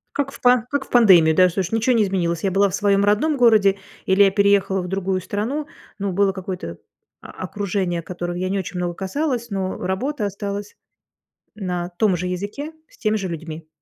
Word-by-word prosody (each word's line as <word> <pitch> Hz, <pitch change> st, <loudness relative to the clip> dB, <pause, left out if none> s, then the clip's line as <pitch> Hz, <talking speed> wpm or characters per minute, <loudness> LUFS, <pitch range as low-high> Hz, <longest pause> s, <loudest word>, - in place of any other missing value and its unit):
Как 280 Hz, -1 st, -1 dB
в -, -, -13 dB
па 245 Hz, -2 st, +4 dB
как 285 Hz, -2 st, -2 dB
в -, -, -22 dB
пандемию, 180 Hz, -10 st, +6 dB
да, 185 Hz, 0 st, +6 dB
слушай, 185 Hz, +3 st, -3 dB
ничё 230 Hz, +3 st, +2 dB
не 225 Hz, -, +3 dB
изменилось. 175 Hz, -4 st, -1 dB
Я 195 Hz, -, +1 dB
была 200 Hz, +2 st, +3 dB
в 185 Hz, -, -2 dB
своем 200 Hz, 0 st, +2 dB
родном 275 Hz, +9 st, +2 dB
городе 215 Hz, -5 st, +4 dB, 0.3 s
или 190 Hz, +2 st, +5 dB
я 195 Hz, -, +4 dB
переехала 200 Hz, -1 st, +2 dB
в 180 Hz, -, -6 dB
другую 190 Hz, 0 st, -1 dB
страну. 245 Hz, -, -3 dB, 0.3 s
Но 200 Hz, -1 st, -2 dB
было 195 Hz, +1 st, +2 dB
какое-то 180 Hz, -, -6 dB, 0.4 s
окружение, 185 Hz, -2 st, -3 dB
которого 175 Hz, +1 st, -5 dB
я 185 Hz, +1 st, -2 dB
не 195 Hz, -, 0 dB
очень 185 Hz, 0 st, -5 dB
много 175 Hz, -1 st, -2 dB
касалась, 235 Hz, -, -2 dB
но 190 Hz, -2 st, -3 dB
работа 215 Hz, +7 st, -2 dB
осталась 200 Hz, +1 st, -5 dB, 0.8 s
на 180 Hz, -4 st, -3 dB
том 210 Hz, -4 st, +3 dB
же 180 Hz, -, -3 dB
языке 205 Hz, -, -5 dB, 0.2 s
с -, -, -23 dB
теми 215 Hz, 0 st, 0 dB
же 195 Hz, -, -3 dB
людьми. 165 Hz, -1 st, -7 dB
195 Hz, 190 wpm, -21 LUFS, 180-215 Hz, 0.8 s, пандемию